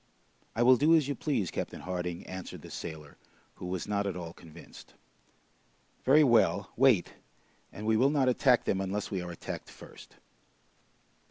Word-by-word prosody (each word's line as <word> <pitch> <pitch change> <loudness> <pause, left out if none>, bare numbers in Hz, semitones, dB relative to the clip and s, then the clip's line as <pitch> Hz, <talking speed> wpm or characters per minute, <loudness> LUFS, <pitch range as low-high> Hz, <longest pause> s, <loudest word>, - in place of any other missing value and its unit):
"I 120 - +2
will 130 +1 +7
do 155 +6 +5
as 155 -4 +2
you 145 - -1
please, 125 - -2
Captain - - -5
Harding," 90 -1 -4
answered 95 -1 -8
the - - -11
sailor, 75 -2 -8 0.4
who 90 - -7
was 90 0 -4
not 100 -1 -1
at 95 - -3
all 85 -2 -7
convinced. 85 -1 -14 1.1
"Very 150 +4 +6
well, 110 -6 +3
wait, 125 -7 +3 0.6
and 105 - -8
we 110 0 +3
will 130 +4 +4
not 140 -3 +2
attack 125 0 +3
them 95 - 0
unless 100 +2 -3
we 95 -3 -2
are 90 - -6
attacked 85 - -7
first." - - -14
100 Hz, 165 wpm, -30 LUFS, 90-130 Hz, 1.1 s, will